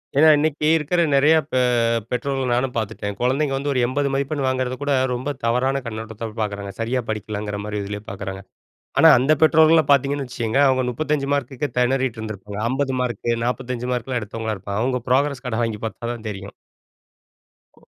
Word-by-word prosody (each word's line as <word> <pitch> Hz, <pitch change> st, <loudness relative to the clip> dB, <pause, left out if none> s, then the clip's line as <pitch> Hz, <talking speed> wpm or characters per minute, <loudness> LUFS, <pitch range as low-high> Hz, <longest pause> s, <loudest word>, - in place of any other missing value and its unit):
ஏன்னா, 150 Hz, +3 st, +6 dB
இன்னைக்கு 150 Hz, 0 st, 0 dB
இருக்கிற 165 Hz, +3 st, +1 dB
நெறைய 150 Hz, +4 st, +5 dB, 0.2 s
பெ 130 Hz, -, +2 dB, 0.5 s
பெற்றோர்கள 135 Hz, +1 st, -1 dB
நானும் 125 Hz, +1 st, 0 dB
பார்த்துட்டேன். 105 Hz, -2 st, -3 dB
குழந்தைங்க 135 Hz, +3 st, +1 dB
வந்து 140 Hz, +1 st, -2 dB
ஒரு 130 Hz, -, +1 dB
80 140 Hz, +2 st, 0 dB
மதிப்பெண் 140 Hz, +1 st, -1 dB
வாங்குறத 130 Hz, -1 st, -1 dB
கூட, 145 Hz, -1 st, +1 dB, 0.2 s
ரொம்ப 130 Hz, +4 st, -3 dB
தவறான 130 Hz, +3 st, +1 dB
கண்ணோட்டத்தோட 110 Hz, 0 st, -6 dB
பார்க்குறாங்க. 100 Hz, -2 st, -3 dB
சரியா 120 Hz, +3 st, 0 dB
படிக்கலங்கிற 105 Hz, -1 st, -4 dB
மாரி 105 Hz, 0 st, -3 dB
இதுலயே 105 Hz, +1 st, -6 dB
பார்க்குறாங்க. 95 Hz, 0 st, -6 dB, 0.6 s
ஆனா, -, -, +8 dB
அந்த 135 Hz, +4 st, +2 dB
பெற்றோர்கள்லாம் 160 Hz, -1 st, +5 dB
பார்த்தீங்கன்னு 140 Hz, 0 st, +2 dB
வச்சுக்கங்க, 120 Hz, +1 st, -1 dB
அவுங்க 130 Hz, -1 st, +2 dB
35 150 Hz, +1 st, -1 dB
மார்க்குக்கே 140 Hz, +1 st, -3 dB
திணறிட்டுருந்துருப்பாங்க. 110 Hz, -6 st, -2 dB
50 135 Hz, 0 st, -1 dB
மார்க்கு, 120 Hz, -2 st, -3 dB, 0.2 s
45 125 Hz, -1 st, -3 dB
மார்க்லாம் 125 Hz, 0 st, -2 dB
எடுத்தவங்களா 110 Hz, +1 st, -4 dB
இருப்பாங்க. 100 Hz, +3 st, -4 dB
அவங்க 125 Hz, -1 st, 0 dB
ப்ரோக்ரஸ் 135 Hz, 0 st, +1 dB
கார்டை 115 Hz, -2 st, -2 dB
வாங்கி 110 Hz, -2 st, -5 dB
பார்த்தா 115 Hz, +1 st, -4 dB
தான் 115 Hz, -2 st, -8 dB
தெரியும். 100 Hz, -1 st, -7 dB, 1.2 s
ஓ! -, -, -22 dB
125 Hz, 155 wpm, -22 LUFS, 110-140 Hz, 1.2 s, ஆனா